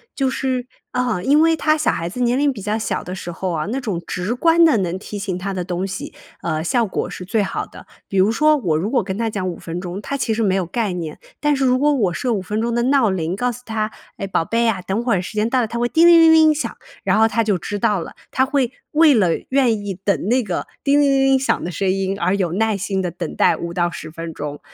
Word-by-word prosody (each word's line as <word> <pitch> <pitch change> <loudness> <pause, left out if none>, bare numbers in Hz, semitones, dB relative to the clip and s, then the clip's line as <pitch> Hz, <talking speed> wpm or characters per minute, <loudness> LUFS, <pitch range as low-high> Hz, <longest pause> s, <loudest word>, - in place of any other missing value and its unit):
就 270 -2 +1
是， 255 -2 -2 0.2
啊， 250 -8 -1
因 290 +2 +4
为 325 0 +4
他 310 0 +2
小 305 - +2
孩 165 +1 -3
子 215 - -7
年 245 +1 +2
龄 285 0 +2
比 220 -7 -8
较 210 +2 -1
小 220 - -2
的 180 - -5
时 175 -2 -6
候 185 +1 -3
啊， 155 -2 -2
那 255 +5 -2
种 205 -9 -3
直 185 +7 -3
观 330 +5 +5
的 315 - +4
能 185 -1 -2
提 205 - -7
醒 195 -3 -3
他 195 +2 -4
的 185 -1 -3
东 180 +1 -3
西， 190 0 -6 0.3
呃， 155 0 -2
效 235 +6 +1
果 190 - -3
是 180 - -7
最 210 +4 0
好 200 - -2
的， - - -14 0.2
比 195 - -2
如 190 +3 +4
说 305 +6 +3
我 170 - 0
如 195 +8 -2
果 260 - +3
跟 190 0 -4
他 230 -1 0
讲 195 -3 -3
5 175 - -6
分 165 +2 -6
钟， 180 +2 -6
他 280 +6 -3
其 235 -3 0
实 225 +1 0
没 190 -2 +2
有 190 - 0
概 215 +3 -2
念。 170 -4 -5 0.2
但 295 -1 +2
是 270 - 0
如 255 0 +3
果 295 +1 +3
我 200 -10 +1
设 245 +6 -1
5 200 - -1
分 210 +3 -3
钟 235 +1 -1
的 240 - +1
闹 260 -3 +3
铃 175 -3 -1
告 245 +4 0
诉 245 +1 -10
他， 220 -1 -2 0.3
诶， 195 - -4
宝 190 - 0
贝 230 +5 +1
啊， 195 -5 0
等 195 +6 -2
会 230 -7 +1
时 180 - -8
间 215 +2 0
到 255 0 +2
了 225 - -1
它 235 +2 -4
会 240 - +1
叮 330 +6 +4
铃 340 -1 +8
铃 325 0 +7
铃 315 -1 +6
响。 305 - -4 0.3
然 195 +2 +2
后 220 - +5
他 230 - +1
就 205 -3 +1
知 205 +4 -5
道 200 -3 +1
了， - - -8 0.2
他 260 - +2
会 265 -3 0 0.2
为 310 -1 +6
了 200 -8 +3 0.2
愿 240 -6 +2
意 195 - -2
等 200 - +1
那 250 +2 +2
个 185 -4 -3 0.2
叮 285 +1 +3
铃 285 - +4
铃 270 0 +3
铃 270 0 +4
响 265 - 0
的 175 - -3
声 190 +3 -1
音， 195 +1 -1
而 185 +2 +1
有 185 -4 -1
耐 220 +2 +1
心 190 0 -2
地 180 - -2
等 175 - -6
待 - - +4
5 170 0 -5
到 175 0 +1
10 155 -1 -8
分 165 0 -7
钟， 145 -1 -6
215 Hz, 290 characters per minute, -20 LUFS, 185-255 Hz, 0.3 s, 铃